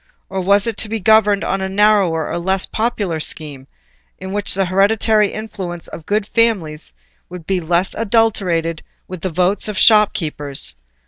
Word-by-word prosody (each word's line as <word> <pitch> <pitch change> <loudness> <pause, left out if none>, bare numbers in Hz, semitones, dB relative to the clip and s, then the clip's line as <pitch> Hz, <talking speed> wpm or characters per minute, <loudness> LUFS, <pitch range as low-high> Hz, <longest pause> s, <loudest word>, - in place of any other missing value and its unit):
or, 190 0 -3
was 200 +2 +3
it 230 -3 -2
to 220 - -2
be 225 0 -2
governed 210 0 +3
on 195 - -1
a 190 - -2
narrower 195 -5 +2
and 170 - -3
less 190 +1 +2
popular 210 -7 -2
scheme, 145 -3 -4 0.5
in 190 +1 -7
which 205 -2 -1
the 195 0 +1
hereditary 205 +3 +2
influence 195 -6 -6
of 160 - -10
good 210 0 0
families 185 - 0 0.4
would 175 -2 -9
be 190 0 0
less 175 +3 0
adulterated 195 -8 0 0.3
with 185 -2 -8
the 190 - -2
votes 180 +5 0
of 210 -2 -4
shopkeepers. 155 - +2
195 Hz, 165 wpm, -18 LUFS, 170-210 Hz, 0.5 s, was